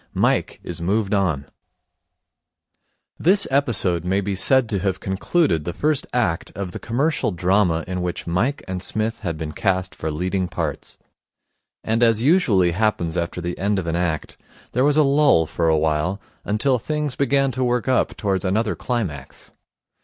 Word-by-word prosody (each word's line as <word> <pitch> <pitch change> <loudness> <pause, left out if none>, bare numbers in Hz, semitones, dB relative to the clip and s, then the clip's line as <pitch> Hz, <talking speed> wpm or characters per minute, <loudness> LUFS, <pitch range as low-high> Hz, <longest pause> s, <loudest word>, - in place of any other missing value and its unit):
Mike - - +1
is 85 -1 -6
Moved 100 +3 0
On 85 -9 0 1.7
This 195 +3 +4
episode 105 - +3
may 95 +2 +1
be 100 0 -2
said 125 +6 +3
to 100 -4 -1
have 95 -1 -1
concluded 95 - 0
the 85 - -4
first 150 - 0
act 110 -10 -1
of 95 -2 -4
the - - -7
commercial 140 +6 0
drama 90 -2 +1
in 90 0 -3
which 90 -1 -4
Mike 110 +12 -1
and 95 -1 -4
Psmith 110 +3 -2
had 85 -7 -4
been 80 -1 -5
cast 95 +3 -1
for 80 - -4
leading 90 +4 -1
parts. 80 -5 -4 0.9
And, 115 +1 0
as 115 -1 +3
usually 125 - +3
happens 90 -4 0
after 85 0 -2
the 85 +1 -3
end 100 +1 0
of 95 - -2
an 85 0 -1
act, 85 -3 -2 0.3
there 125 - +1
was 145 +1 +3
a 155 - +6
lull 140 - +4
for 85 +1 0
a 80 - +3
while 80 +5 0 0.2
until 120 +5 +1
things 150 +1 -3
began 135 0 +2
to 130 +1 -2
work 125 -1 0
up 130 -1 +1
towards 100 -3 -1
another 105 +4 0
climax. 95 - -5
100 Hz, 170 wpm, -22 LUFS, 85-125 Hz, 1.7 s, a